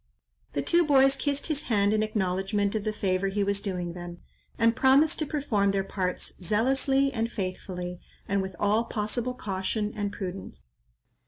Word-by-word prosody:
The -, -, -1 dB
two 345 Hz, 0 st, +4 dB
boys 270 Hz, -3 st, +5 dB
kissed 285 Hz, -1 st, 0 dB
his 300 Hz, -2 st, -1 dB
hand 205 Hz, -3 st, +2 dB
in 215 Hz, -, +2 dB
acknowledgment 200 Hz, -1 st, 0 dB
of 215 Hz, -1 st, -2 dB
the 215 Hz, -, +1 dB
favour 195 Hz, -2 st, 0 dB
he 200 Hz, +1 st, 0 dB
was 200 Hz, 0 st, 0 dB
doing 180 Hz, -4 st, -3 dB
them; 175 Hz, 0 st, -8 dB, 0.4 s
and 230 Hz, -1 st, +3 dB
promised 275 Hz, +5 st, +4 dB
to 310 Hz, -, -1 dB
perform 235 Hz, -10 st, +1 dB
their 195 Hz, 0 st, +1 dB
parts 185 Hz, -2 st, -3 dB
zealously 270 Hz, +7 st, +2 dB
and 230 Hz, -1 st, -1 dB
faithfully, 180 Hz, -3 st, -4 dB, 0.3 s
and 200 Hz, 0 st, +1 dB
with 190 Hz, -1 st, -5 dB
all 215 Hz, +3 st, +2 dB
possible 230 Hz, +3 st, -2 dB
caution 210 Hz, 0 st, -2 dB
and 205 Hz, -1 st, -2 dB
prudence. 190 Hz, -1 st, -6 dB
210 Hz, 165 wpm, -27 LUFS, 190-250 Hz, 0.4 s, boys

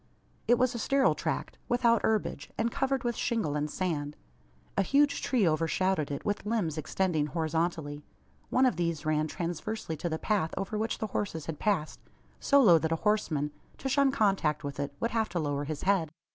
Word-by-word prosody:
It 240 Hz, +2 st, +5 dB
was 250 Hz, 0 st, +2 dB
a 235 Hz, -, -4 dB
sterile 275 Hz, +3 st, +3 dB
tract, -, -, -3 dB
without 240 Hz, -2 st, +3 dB
herbage, 215 Hz, -9 st, -1 dB
and 230 Hz, +1 st, 0 dB
covered 270 Hz, 0 st, 0 dB
with 240 Hz, -1 st, -1 dB
shingle 215 Hz, -13 st, -1 dB
and 150 Hz, 0 st, -1 dB
sand. 150 Hz, -4 st, -2 dB, 0.6 s
A -, -, +3 dB
huge 285 Hz, +9 st, +3 dB
tree 235 Hz, -8 st, +2 dB
overshadowed 165 Hz, +1 st, +1 dB
it, 140 Hz, -, -5 dB
with 205 Hz, 0 st, -1 dB
limbs 210 Hz, -8 st, -1 dB
extending 160 Hz, 0 st, 0 dB
horizontally. 160 Hz, -2 st, -2 dB, 0.5 s
One 260 Hz, +1 st, +4 dB
of 245 Hz, -10 st, +2 dB
these 170 Hz, -3 st, -1 dB
ran 155 Hz, 0 st, +1 dB
transversely 175 Hz, +2 st, -4 dB
to 175 Hz, -, -3 dB
the 160 Hz, -, -1 dB
path 190 Hz, -3 st, 0 dB
over 195 Hz, +3 st, -3 dB
which 220 Hz, +2 st, -1 dB
the 220 Hz, -, -2 dB
horses 165 Hz, -7 st, -2 dB
had 160 Hz, -3 st, -5 dB
passed 185 Hz, -8 st, 0 dB, 0.4 s
so 280 Hz, -, +4 dB
low 175 Hz, -7 st, +7 dB
that 160 Hz, +1 st, -1 dB
a -, -, +3 dB
horseman, 160 Hz, -9 st, +1 dB, 0.3 s
to -, -, -4 dB
shun 275 Hz, 0 st, +3 dB
contact 195 Hz, -, +1 dB
with 140 Hz, 0 st, -5 dB
it, 140 Hz, 0 st, -2 dB
would 230 Hz, -, -1 dB
have 225 Hz, -1 st, 0 dB
to 175 Hz, 0 st, -2 dB
lower 145 Hz, -2 st, -1 dB
his 150 Hz, 0 st, -4 dB
head. 185 Hz, -5 st, +2 dB
175 Hz, 190 wpm, -29 LUFS, 155-225 Hz, 0.6 s, low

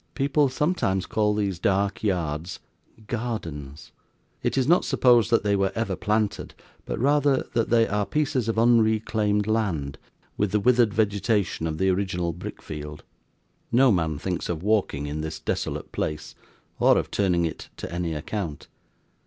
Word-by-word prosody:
People 140 Hz, 0 st, +2 dB
sometimes 130 Hz, -, 0 dB
call 105 Hz, -2 st, +1 dB
these 100 Hz, -4 st, -1 dB
dark 100 Hz, +2 st, 0 dB
yards 85 Hz, -4 st, -2 dB, 0.5 s
'gardens'; 80 Hz, -, -5 dB, 0.5 s
it -, -, -1 dB
is 130 Hz, -, +2 dB
not 175 Hz, +3 st, +4 dB
supposed 120 Hz, -3 st, +4 dB
that 115 Hz, -, +3 dB
they 100 Hz, -1 st, +2 dB
were 95 Hz, -1 st, +1 dB
ever 110 Hz, -4 st, -1 dB
planted, 105 Hz, +1 st, -1 dB, 0.3 s
but -, -, -3 dB
rather 145 Hz, +1 st, +2 dB
that 115 Hz, -1 st, +1 dB
they 115 Hz, -1 st, +4 dB
are 105 Hz, 0 st, -1 dB
pieces 145 Hz, -6 st, 0 dB
of 115 Hz, -, -1 dB
unreclaimed 110 Hz, -3 st, +2 dB
land, 95 Hz, -11 st, -1 dB, 0.4 s
with 105 Hz, -2 st, 0 dB
the 105 Hz, -, +2 dB
withered 120 Hz, 0 st, +4 dB
vegetation 100 Hz, -4 st, 0 dB
of 80 Hz, -1 st, -3 dB
the 95 Hz, +3 st, +2 dB
original 90 Hz, -3 st, -1 dB
brick 90 Hz, -, -8 dB
field. 75 Hz, -1 st, -7 dB, 0.7 s
No 125 Hz, +2 st, +5 dB
man 80 Hz, -5 st, 0 dB
thinks 90 Hz, +3 st, -3 dB
of 85 Hz, -1 st, -3 dB
walking 100 Hz, -9 st, +1 dB
in 75 Hz, +1 st, -4 dB
this 80 Hz, 0 st, -5 dB
desolate 80 Hz, -, -3 dB
place, 75 Hz, 0 st, -4 dB, 0.5 s
or -, -, +5 dB
of -, -, -2 dB
turning 90 Hz, -4 st, +1 dB
it 80 Hz, -, -6 dB
to -, -, -6 dB
any 85 Hz, -2 st, -2 dB
account. 80 Hz, -1 st, -5 dB
100 Hz, 155 wpm, -25 LUFS, 85-115 Hz, 0.7 s, No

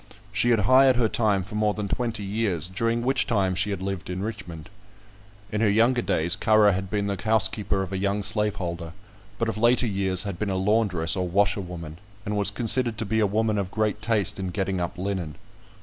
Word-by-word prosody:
She 105 Hz, +4 st, +2 dB
had 115 Hz, -3 st, +3 dB
hired 130 Hz, +5 st, +5 dB
her 120 Hz, -2 st, +2 dB
time 105 Hz, -4 st, +1 dB
for 105 Hz, +4 st, -12 dB
more 105 Hz, -1 st, +1 dB
than 105 Hz, -1 st, -3 dB
twenty 115 Hz, -1 st, -2 dB
years, 100 Hz, -5 st, -1 dB
during 115 Hz, +5 st, -1 dB
which 130 Hz, +1 st, +1 dB
time 100 Hz, -7 st, +1 dB
she 95 Hz, +3 st, 0 dB
had 95 Hz, -2 st, -3 dB
lived 95 Hz, -2 st, -4 dB
in 90 Hz, +1 st, -3 dB
Richmond. 90 Hz, -7 st, -7 dB, 0.8 s
In 105 Hz, -, -1 dB
her 110 Hz, -, +4 dB
younger 120 Hz, +4 st, +3 dB
days 90 Hz, -4 st, +1 dB
Currer 110 Hz, -2 st, +4 dB
had 95 Hz, 0 st, -3 dB
been 100 Hz, +1 st, -1 dB
the 100 Hz, -2 st, -3 dB
housekeeper 105 Hz, -3 st, +1 dB
of 95 Hz, 0 st, -7 dB
a 95 Hz, -, -2 dB
young 100 Hz, +1 st, -1 dB
slaveholder; 90 Hz, -6 st, -1 dB, 0.4 s
but 115 Hz, -, -1 dB
of 115 Hz, -, -3 dB
later 120 Hz, +2 st, +3 dB
years 95 Hz, -3 st, 0 dB
had 100 Hz, -4 st, -5 dB
been 105 Hz, -, -1 dB
a 95 Hz, -, -1 dB
laundress 95 Hz, -4 st, +1 dB
or 90 Hz, -1 st, -1 dB
washerwoman, 90 Hz, -4 st, -1 dB, 0.3 s
and 105 Hz, -, -2 dB
was 100 Hz, -1 st, +1 dB
considered 120 Hz, +1 st, +1 dB
to 115 Hz, -, -2 dB
be 110 Hz, +2 st, 0 dB
a 105 Hz, -, +3 dB
woman 110 Hz, +1 st, 0 dB
of 95 Hz, -2 st, -3 dB
great 105 Hz, +1 st, -1 dB
taste 110 Hz, -4 st, 0 dB
in 95 Hz, -1 st, -3 dB
getting 95 Hz, 0 st, -2 dB
up 85 Hz, +3 st, -4 dB
linen. 90 Hz, -5 st, -3 dB
100 Hz, 210 wpm, -25 LUFS, 95-110 Hz, 0.8 s, hired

